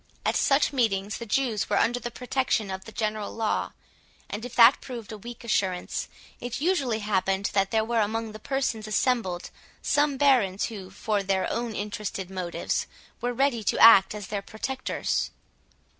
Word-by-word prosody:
At - - +1
such 285 +1 +3
meetings 210 -5 0
the 235 - -7
Jews 230 -2 0
were 205 - +2
under 240 +2 +2
the 240 - -4
protection 245 -4 -1
of 190 0 -6
the 225 - -9
general 215 -2 -2
law; 225 -1 -1 0.6
and 210 +2 -4
if 245 0 -7
that 235 +3 +7
proved 235 -5 -8
a 215 - -6
weak 240 +3 -9
assurance, 190 -5 -1 0.3
it 245 -1 -4
usually 275 -9 +1
happened 195 -1 0
that 195 -1 +2
there 220 -1 +1
were 235 0 0
among 220 +1 -2
the 215 - -9
persons 230 -4 -2
assembled 215 -5 0 0.3
some 290 -1 +2
barons, 245 -9 +3
who, 195 -5 -8
for 205 +1 -1
their 195 -1 0
own 235 -2 -3
interested 205 -2 -4
motives, 180 -2 -2 0.3
were 245 +1 0
ready 245 -2 +1
to - - 0
act 210 -3 +8
as 205 -1 -6
their 205 -1 -2
protectors. 260 +6 -2
220 Hz, 170 wpm, -26 LUFS, 200-245 Hz, 0.6 s, act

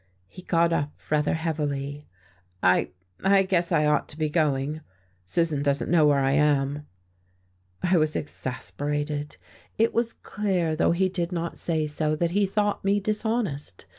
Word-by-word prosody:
He 100 - -12
got 170 -1 +2
up 145 -2 0 0.2
rather 150 0 +2
heavily. 145 -3 -3 0.6
"I 90 0 +4 0.3
I 195 0 +5
guess 180 -2 0
I 150 - +3
ought 150 -1 +1
to 150 - -10
be 155 -1 0
going. 150 -1 0 0.4
Susan 160 - 0
doesn't 140 +1 0
know 160 -3 +5
where 140 -2 +3
I 135 0 +2
am." 145 0 +1 1.0
I 180 0 +3
was 155 -1 +1
exasperated. 145 +2 -4 0.4
It 225 +1 +2
was 230 0 0
clear, 185 -6 -1
though 155 - +2
he 190 +2 +2
did 180 -1 -3
not 170 -1 -3
say 160 -2 0
so, 150 +1 -1
that 170 +2 0
he 200 +2 +2
thought 205 +1 0
me 200 +1 +2
dishonest. 210 - -2
155 Hz, 155 wpm, -26 LUFS, 145-180 Hz, 1.0 s, I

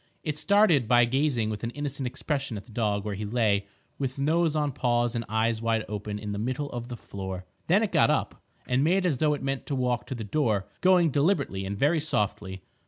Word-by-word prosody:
It 150 -2 -2
started 165 - +4
by 120 0 +5
gazing 125 -3 +1
with 105 +1 -6
an 115 - -1
innocent 140 0 -4
expression 135 -2 -3
at 100 - -9
the - - -16
dog 105 -2 -1
where 105 - -2
he 100 +2 -4
lay 105 -2 +1 0.3
with 135 0 -2
nose 160 +3 +2
on 150 -2 +1
paws 120 -2 +1
and 115 -1 -2
eyes 110 +1 +1
wide 115 -1 0
open 105 0 -4
in 105 0 -5
the 100 - -3
middle 130 +5 -2
of 120 -1 -5
the 120 -1 -6
floor. 95 -2 -6 0.2
Then - - +4
it - - -1
got - - +4
up - - -1 0.2
and 125 +2 +1
made 185 +4 +2
as 160 -7 +1
though 150 +2 +2
it 145 - -8
meant 135 0 -3
to 140 - -1
walk 125 -2 -1
to 130 - -4
the 115 - -5
door, 105 -4 0
going 180 -4 +5
deliberately 140 - +1
and 100 +1 -4
very 150 +7 +3
softly. 105 -9 -2
120 Hz, 225 wpm, -27 LUFS, 105-145 Hz, 0.3 s, by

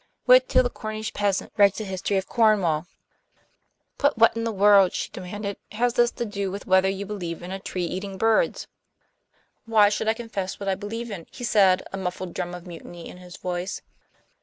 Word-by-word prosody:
Wait 255 0 +6
till 255 - +4
the 245 - 0
Cornish 215 -1 -5
peasant 200 -2 -1
writes 200 0 +5
a - - -3
history 190 0 -2
of 190 - -2
Cornwall." 190 -9 +2 1.1
"But 285 -3 +2
what 230 0 +5
in 230 0 -2
the 230 - -1
world," 200 -2 +5
she - - -3
demanded, 200 +2 -6 0.2
"has 240 +2 +1
this 240 -1 +4
to 235 - -3
do 200 -2 -3
with 200 +2 -6
whether 190 0 +4
you 195 +1 -3
believe 175 -5 -5
in 180 - -7
a 195 - -4
tree 180 -2 -3
eating 190 +3 -5
birds?" 225 - +2 1.0
"Why 215 -3 +5
should 210 +1 -2
I 220 - +2
confess 205 -5 -5
what 200 - -6
I 195 - +2
believe 220 +4 -5
in?" 175 -5 -7
he 250 - -10
said, 195 -5 +4
a - - -3
muffled 185 -1 -4
drum 180 -1 -4
of 175 0 -10
mutiny 175 -1 -10
in - - -11
his 180 -1 -12
voice. 180 +1 -4
200 Hz, 200 wpm, -25 LUFS, 185-220 Hz, 1.1 s, Wait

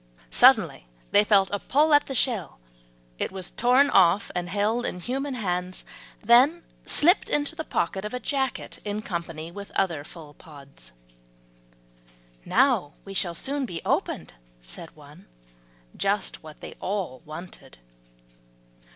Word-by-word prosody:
Suddenly - - +4 0.2
they 205 - +6
felt 200 -2 +3
a 205 - -1
pull 300 +7 +2
at 290 - +5
the 270 - -4
shell; 225 - -1 0.6
it - - -1
was 190 -2 -5
torn 255 +4 +3
off, 185 +2 +4
and 175 0 -3
held 210 +5 0
in 180 - -3
human 270 +7 -3
hands, 180 -4 -3 0.4
then 255 +10 +5 0.2
slipped 350 +6 +3
into 295 +2 -1
the 320 - -4
pocket 190 - -2
of 210 - -4
a 250 - -3
jacket 265 +1 -3
in 210 +1 -4
company 170 -3 -5
with 200 +2 -9
other 170 -7 0
full 155 -1 -12
pods. 140 - -14 1.5
"Now 240 - +2
we 195 - -8
shall 175 -3 -1
soon 275 +5 -2
be 170 -5 -5
opened," - - -1 0.3
said - - -10
one, - - -16 0.7
just 200 +1 -1
what 155 -1 -13
they - - -8
all 185 -10 -3
wanted. 155 - -11
200 Hz, 140 wpm, -25 LUFS, 170-250 Hz, 1.5 s, they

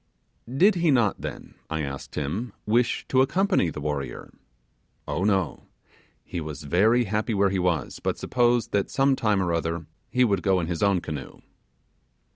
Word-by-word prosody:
'Did 185 +11 +5
he 170 -2 +1
not 120 -8 +2
then,' - - -7 0.2
I 80 -1 -2
asked 70 -1 -6
him, 85 - -3
'wish 115 +2 +1
to 130 - +4
accompany 180 - +2
the 75 - -6
warrior?' 75 -2 -4 0.7
'Oh 90 - -1
no: 95 -6 0 0.6
he 85 - -5
was 75 -2 -6
very 105 +11 +3
happy 110 +1 -1
where 100 -1 +3
he 95 - 0
was; 90 -6 -1
but - - -2
supposed 120 -1 +1
that 100 -1 0
some 135 0 +3
time 105 -6 +1
or 85 -2 0
other 85 0 -2 0.2
he 125 - +3
would 100 -6 +2
go 95 -1 +2
in 85 - -1
his 85 -1 -3
own 100 -3 +3
canoe. 75 -5 -7
100 Hz, 170 wpm, -25 LUFS, 85-120 Hz, 0.7 s, Did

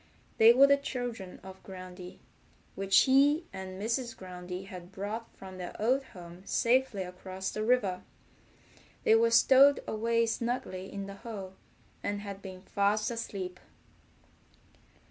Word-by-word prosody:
They 225 +1 +9
were 260 +3 +7
the 280 0 +5
children 245 -8 -5
of 190 0 -11
Groundy, 185 -1 -10 0.6
which 195 -1 +4
he 285 +5 +4
and 190 0 -7
Mrs. 235 +3 -2
Groundy 180 0 -7
had 180 -2 -10
brought 210 +4 -5
from 190 -1 -10
their 180 - -7
old 255 +6 +2
home 175 -4 -12
safely 235 -2 +1
across 185 +1 -6
the 215 - -3
river. 215 -6 +1 1.0
They - - +5
were 230 +1 +5
stowed 270 +4 +6
away 230 +1 +1
snugly 225 -5 -3
in 200 0 -5
the 195 0 -9
hole, 195 -5 -7 0.5
and 205 0 -3
had 200 -1 -7
been 185 -1 -9
fast 205 +3 +1
asleep. 195 -6 -5
200 Hz, 135 wpm, -30 LUFS, 185-235 Hz, 1.0 s, They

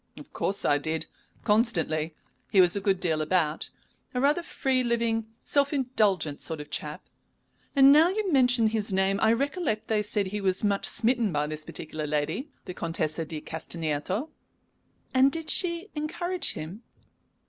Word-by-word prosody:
"Of - - -13
course 200 - -1
I 145 - +3
did. 160 +2 -2 0.4
Constantly. 165 -8 +1 0.3
He 195 - +3
was 180 0 +6
a 200 - -2
good 195 -2 +1
deal 160 -4 0
about 155 -1 0 0.5
a - - +1
rather 290 +6 +3
free 265 -6 0
living, 230 -2 0 0.2
self 280 0 +2
indulgent 210 - +1
sort 160 -1 -4
of 150 0 -9
chap. 150 0 -5 0.7
And 275 0 +8
now 310 +4 +6
you 400 0 -1
mention 245 -5 +4
his 215 -2 -1
name, 190 +1 +1
I 220 - +5
recollect 275 - -1
they 215 -1 +2
said 210 -1 0
he 210 +1 -4
was 190 0 +2
much 200 -1 +1
smitten 230 -3 +1
by 150 -1 0
this 155 0 -3
particular 155 0 -6
lady, 150 - -2 0.2
the 180 - -6
Contessa 165 -2 -2
di 155 -1 -6
Castagneto." 165 - -3 0.8
"And 265 +1 +5
did 325 0 -3
she 350 +3 +1
encourage 345 +4 -2
him?" 170 +8 -7
210 Hz, 160 wpm, -27 LUFS, 160-260 Hz, 0.8 s, And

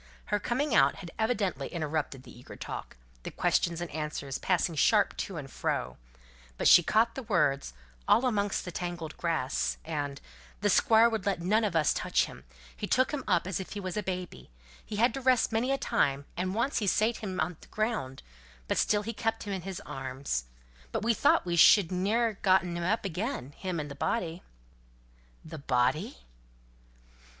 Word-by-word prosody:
Her 205 - +3
coming 260 +5 -1
out 140 -5 +5
had 175 -3 -9
evidently 200 - 0
interrupted 150 -5 -3
the - - -13
eager 120 - -12
talk, - - -7 0.2
the - - -6
questions 170 0 0
and 175 - -5
answers 150 -3 -4
passing 180 -2 +1
sharp 205 +7 +3
to 190 - -4
and 140 -3 -6
fro; 65 - -3 0.6
but - - +2
she 175 - +9
caught 225 +7 +2
the 265 - -5
words, 150 - +1 0.3
"all 255 - +4
amongst 205 -5 0
the 180 - -5
tangled 175 -3 -5
grass," 160 -6 -1
and 145 -3 -3 0.4
"the 205 0 +3
Squire 225 +4 +5
would 225 -4 -2
let 195 -4 +1
none 210 +6 +2
on 200 -5 -1
us 155 -2 +3
touch - - +1
him: - - -12 0.3
he - - -4
took 255 +1 +2
him 290 -3 -3
up 180 -4 +2
as 185 -1 -2
if 190 - -7
he 205 - -5
was 185 -1 -4
a 210 - 0
baby; 180 - -5 0.3
he 210 - -7
had 235 +4 +3
to 270 - -4
rest 255 -3 +3
many 230 +4 +1
a 275 - +2
time, 140 - 0
and 185 +2 -2
once 235 +5 0
he 210 - -2
sate 220 +4 +2
him 200 -4 -5
down 155 - +2
on 175 -1 -8
the - - -15
ground; 215 - -3 0.4
but - - 0
still 210 -1 +2
he 230 +2 -4
kept 225 +1 -2
him 205 - -4
in 190 - -3
his 190 +1 -6
arms; 130 - -4 0.5
but - - -2
we 230 +1 +3
thought 210 - +3
we 175 -1 -1
should 180 +1 +6
ne'er 210 +6 +1
have 210 - -11
gotten 185 -2 +3
him 170 - -3
up 205 +4 0
again 190 - -3
him 180 +2 -4
and 150 -1 -5
the - - -4
body." 170 +3 -2 1.0
"The 160 0 -8
body!" 125 - 0
185 Hz, 195 wpm, -29 LUFS, 155-215 Hz, 1.0 s, she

